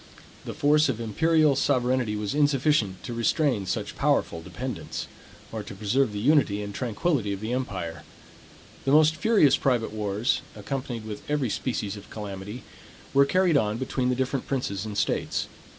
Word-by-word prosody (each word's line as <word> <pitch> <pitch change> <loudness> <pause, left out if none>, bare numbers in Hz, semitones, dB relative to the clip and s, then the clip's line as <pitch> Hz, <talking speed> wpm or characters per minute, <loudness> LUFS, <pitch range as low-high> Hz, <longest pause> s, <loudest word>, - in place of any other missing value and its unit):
The - - -5
force 150 +1 +4
of 120 -4 -1
imperial 155 +6 +3
sovereignty 125 -4 +1
was 105 -1 -2
insufficient 145 -8 +2
to 120 - -5
restrain 115 - +1
such - - -3
powerful 80 - +1
dependants; - - -5 0.5
or - - -4
to - - -9
preserve 110 +5 +1
the 105 - -5
unity 110 -5 +3
and 100 0 -6
tranquillity 120 0 -1
of 100 - -5
the 110 +3 -3
empire. 90 - -3 0.8
The 135 - +2
most 155 +1 +6
furious 200 - +4
private 120 -5 0
wars, 105 +4 0
accompanied 125 -5 -4
with 105 -1 -6
every 145 -6 0
species 105 -5 -2
of 100 - -12
calamity, 105 +2 -7 0.5
were 140 0 +6
carried 180 -2 +3
on 105 -3 +1
between 130 0 -1
the 125 - +1
different 130 +1 -2
princes 110 -6 -2
and 105 -1 -5
states. - - 0
125 Hz, 160 wpm, -26 LUFS, 105-140 Hz, 0.8 s, most